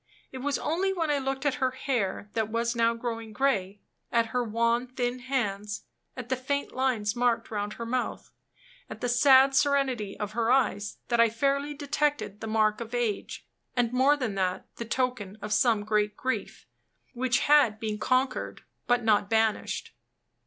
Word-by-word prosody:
It 260 - -7
was 280 +2 -1
only 365 +5 0
when 330 -5 0
I 290 - +1
looked 270 +1 -3
at 290 0 0
her 260 - +3
hair, 240 -6 -2
that 220 -2 -1
was 235 +1 -1
now 230 0 +2
growing 230 -2 -5
gray 205 -6 0 0.3
at 230 -1 +3
her 250 0 +1
wan, 235 +2 +1
thin 250 0 -2
hands 210 -6 -2 0.3
at 250 -2 -6
the 260 - +2
faint 280 +3 -2
lines 245 -6 0
marked 240 -2 +1
round 205 -1 -3
her 230 - -6
mouth 250 +2 -3 0.6
at - - -8
the 245 - 0
sad 265 +2 +6
serenity 265 -7 +1
of 210 -1 -3
her 230 +1 0
eyes, 210 -6 +1
that 235 -1 +1
I 230 0 +6
fairly 280 +5 0
detected 285 -8 -1
the 225 - -4
mark 215 0 +1
of 235 +1 -5
age; 230 -4 -2 0.3
and, 245 -1 +1
more 270 +4 +4
than 250 -7 -2
that, 185 -2 -1
the 235 - -4
token 235 -5 -2
of 210 0 -3
some 220 -2 +3
great 210 -1 0
grief, 260 0 -3 0.5
which 255 0 +1
had 275 -8 +4
been 215 -1 -3
conquered, 255 +2 0 0.2
but 245 0 +2
not 210 -2 +3
banished. 220 -1 0
240 Hz, 175 wpm, -28 LUFS, 215-265 Hz, 0.6 s, sad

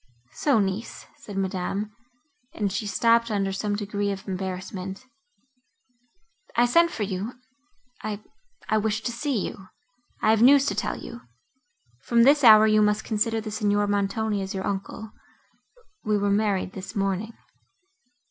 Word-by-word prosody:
"So, 285 -5 +2
niece!"—said 210 +3 -4
Madame, 195 +2 -2 0.6
and 205 -3 -1
she 205 +2 -3
stopped 230 +3 +3
under 200 -2 0
some 205 +2 -2
degree 205 0 -2
of 195 0 -7
embarrassment.—"I 245 - -7
sent 335 +8 +4
for 225 - -4
you—I—I 250 - -7
wished 220 +1 -2
to 240 - 0
see 240 -3 -2
you; 190 - -10 0.5
I 215 - +3
have 220 0 +3
news 275 +3 +7
to - - 0
tell - - -2
you. 235 - -9 0.8
From 235 - +3
this 285 +3 +5
hour 215 -2 +9
you 215 0 +4
must 210 0 +2
consider 225 +1 0
the 215 -1 -6
Signor 205 -1 +1
Montoni 205 +1 -1
as 190 0 -5
your 190 - -3
uncle—we 215 - -6
were 200 0 +1
married 200 -2 0
this 195 +3 -8
morning." 195 +2 -1
215 Hz, 130 wpm, -25 LUFS, 200-245 Hz, 0.8 s, hour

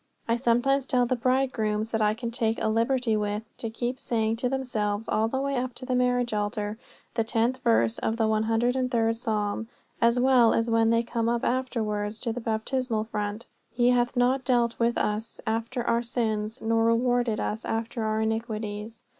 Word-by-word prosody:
I 230 - +2
sometimes 255 +3 +2
tell 250 -1 +2
the 255 +1 0
bridegrooms 230 -4 0
that 225 - 0
I 210 0 +3
can 235 0 -4
take 225 -1 0
a - - 0
liberty 230 +1 +1
with 210 0 -1
to 230 - -4
keep 240 +3 -3
saying 225 -1 0
to 250 +2 0
themselves 225 -5 -2
all 220 +1 +1
the 265 +4 -2
way 275 0 -1
up 250 0 -2
to 255 - -8
the 255 - -1
marriage 245 -1 +1
altar 210 +1 -2 0.3
the 230 - +1
tenth 230 +3 0
verse 115 - +3
of 225 - -1
the 225 - +1
103rd 225 +2 +1
psalm; 220 -1 -2 0.3
as 235 +1 +4
well 250 -3 +5
as 230 0 0
when 225 0 +4
they 230 0 +3
come 230 -1 -1
up 235 0 0
afterwards 220 -4 -1
to 230 -3 -2
the 245 - -5
baptismal 225 +1 -1
font: 210 +1 -4 0.3
"He 240 +1 +3
hath 245 0 +1
not 255 +2 +2
dealt 240 -2 +1
with 235 0 +2
us 210 +2 -2
after 230 +2 -2
our 235 0 +1
sins 225 -1 -2
nor 225 0 +2
rewarded 240 -1 +2
us 215 +1 -2
after 225 +1 -3
our 215 0 0
iniquities." 220 0 -3
230 Hz, 185 wpm, -27 LUFS, 220-245 Hz, 0.3 s, well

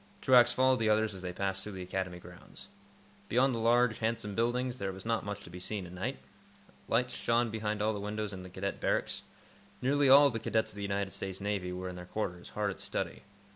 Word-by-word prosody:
Truax 120 -2 +6
followed 130 0 +3
the 110 -1 +2
others 110 0 +2
as 95 - -8
they 90 -1 -4
passed 95 +1 -1
through 105 +1 -6
the 95 -1 -5
Academy 90 -1 -3
grounds. 90 0 -11 0.6
Beyond 130 +3 +3
the 115 - -2
large, 120 0 +3
handsome 110 -2 -1
buildings, 120 +3 0
there 95 -1 -2
was 95 +1 -8
not 115 -1 0
much 100 0 -5
to - - -11
be 90 - -8
seen 100 +1 -4
at 90 - -10
night. 90 0 -3 0.7
Lights 125 +2 +1
shone 115 0 +1
behind 105 -1 -2
all 110 +1 +2
the 105 - -4
windows 105 0 -3
in 95 -1 -8
Cadet 95 +2 -4
Barracks. - - 0 0.6
Nearly 140 +2 +3
all 140 +2 +9
of 140 - +3
the 115 - -2
cadets 110 0 0
of - - -12
the - - -5
United 100 -1 -1
States 95 -1 -5
Navy 100 -3 -2
were 90 +1 -4
in 90 -1 -6
their 90 - -8
quarters, 90 -4 -4
hard 105 -1 -1
at - - -8
study. - - -3
105 Hz, 225 wpm, -32 LUFS, 95-115 Hz, 0.7 s, all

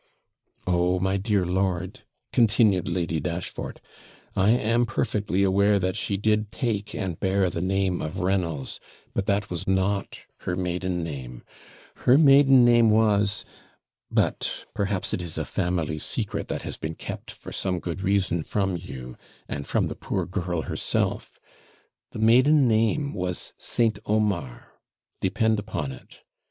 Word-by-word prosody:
'Oh, 90 0 +2
my 95 +1 +1
dear 100 -2 +1
lord,' 95 0 -1 0.3
continued 110 -5 +3
Lady 85 -2 -1
Dashfort; 85 +3 -5 0.6
'I 95 +2 +3
am 120 +1 +3
perfectly 105 -4 0
aware 100 +2 +4
that 95 -1 -1
she 100 - -1
did 105 0 +1
take 105 -6 -2
and 90 -4 -3
bear 95 -1 +1
the 80 - -3
name 95 -1 0
of 80 +4 -4
Reynolds; 90 -7 -1 0.3
but 100 - -2
that 100 0 0
was 85 - -3
not 95 +1 0 0.2
her 90 - -3
maiden 90 -1 -2
name 65 -6 -7 0.6
her 125 - +8
maiden 135 -4 +7
name 120 -1 +5
was; 105 -1 +2 0.6
but - - 0
perhaps 100 -2 0
it - - -1
is 85 -2 -5
a - - -2
family 85 -3 -1
secret - - -3
that - - -4
has - - -4
been 80 +1 -5
kept, - - -7
for - - -9
some 95 -2 -1
good 90 +2 -5
reason 95 -3 +1
from 95 +2 -1
you, 65 -8 -8 0.3
and 70 -1 -5
from - - +1
the - - -3
poor - - -3
girl 85 -3 -2
herself; - - -1 0.7
the - - -9
maiden 130 +6 +5
name 115 +6 +1
was 90 -1 -2
St. 115 -4 +1
Omar, 100 - -1 0.5
depend 110 +3 +1
upon 100 -9 -4
it. - - -14
95 Hz, 145 wpm, -25 LUFS, 90-105 Hz, 0.7 s, her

